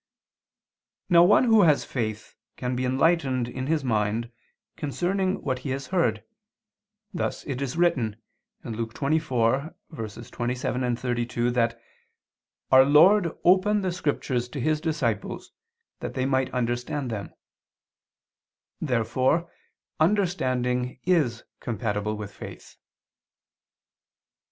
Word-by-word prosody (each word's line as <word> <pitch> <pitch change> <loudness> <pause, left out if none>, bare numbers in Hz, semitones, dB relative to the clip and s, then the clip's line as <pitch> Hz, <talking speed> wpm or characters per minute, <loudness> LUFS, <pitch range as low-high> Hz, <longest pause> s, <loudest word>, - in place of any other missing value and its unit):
Now 170 -2 +7
one 205 +7 +5
who 225 -3 +5
has 155 -6 +4
faith 110 -4 -4 0.2
can 125 0 -2
be 130 +1 -1
enlightened 130 -2 +2
in 130 +2 -5
his 155 -2 +1
mind 110 0 0 0.4
concerning 185 +6 -1
what 130 -2 -1
he 135 - -6
has 135 +1 -3
heard; 120 - +1 0.9
thus 175 - -3
it 135 -2 -4
is 140 +3 -3
written 130 -12 +2 0.5
(Luke 115 0 -5
24:27, 125 -3 -2
32) 120 -1 -1
that 115 -1 0 0.9
Our 130 0 +8
Lord 170 +6 +5
opened 195 +3 +4
the 185 - 0
scriptures 140 -7 -2
to 140 - -6
His 155 +4 0
disciples, 135 -10 -2 0.5
that - - -6
they 130 - 0
might 130 -1 +1
understand 125 +2 -2
them. 105 -3 -6 1.4
Therefore 130 +5 0 0.5
understanding 130 -10 +1
is 150 -11 +1 0.2
compatible 105 -1 -2
with 105 -1 -7
faith. - - -11
130 Hz, 105 wpm, -26 LUFS, 120-160 Hz, 1.4 s, Our